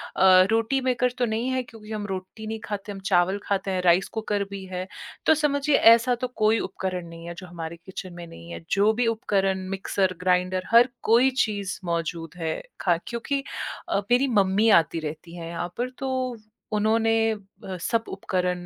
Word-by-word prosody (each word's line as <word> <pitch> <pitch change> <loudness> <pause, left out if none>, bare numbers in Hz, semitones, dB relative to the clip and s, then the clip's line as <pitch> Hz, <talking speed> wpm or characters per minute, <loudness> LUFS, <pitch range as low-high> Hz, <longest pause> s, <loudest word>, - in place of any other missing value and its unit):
अ, 185 -1 +7
रोटी 225 +4 +2
maker 250 -1 +1
तो 250 - +2
नहीं 230 +2 -1
है, 260 0 0
क्योंकि 220 -2 -13
हम 210 -1 -3
रोटी 190 +3 -6
नहीं 220 0 -4
खाते, 205 -1 -5
हम 195 - -7
चावल 185 +2 +3
खाते 195 -1 -1
हैं, 185 -1 0
राइस 180 +2 +4
कुकर 210 -2 -1
भी 200 -1 -6
है। 185 0 -4 0.4
तो - - +6
समझिए 295 -1 +2
ऐसा 230 +1 +6
तो 255 - 0
कोई 215 +1 +3
उपकरण 180 -2 -4
नहीं 165 0 -10
है 170 - -5
जो 185 - -9
हमारे 170 -1 -6
किचन 185 -1 -7
में 175 0 -8
नहीं 85 - -12
है, 85 0 -7
जो 205 +2 +4
भी 240 +1 +1
उपकरण 195 -4 0
मिक्सर-ग्राइंडर 185 -1 0
हर 235 +2 +7
कोई 240 +4 +5
चीज़ 205 -5 -1
मौजूद 165 -1 -3
है। 160 -2 -2 0.2
खा 175 -3 +3
क्योंकि 275 +4 -2 0.5
अ, - - +1
मेरी 250 +3 +4
मम्मी 205 -1 +3
आती 165 -4 +4
रहती 160 +2 -7
हैं 170 -1 -7
यहाँ 170 +1 -3
पर, 245 +2 -1
तो 270 - -4 0.6
उन्होंने 220 +2 +2 0.2
अ, 195 -2 -9
सब 230 +5 0
उपकरण 180 -2 -2
195 Hz, 185 wpm, -25 LUFS, 180-225 Hz, 0.6 s, अ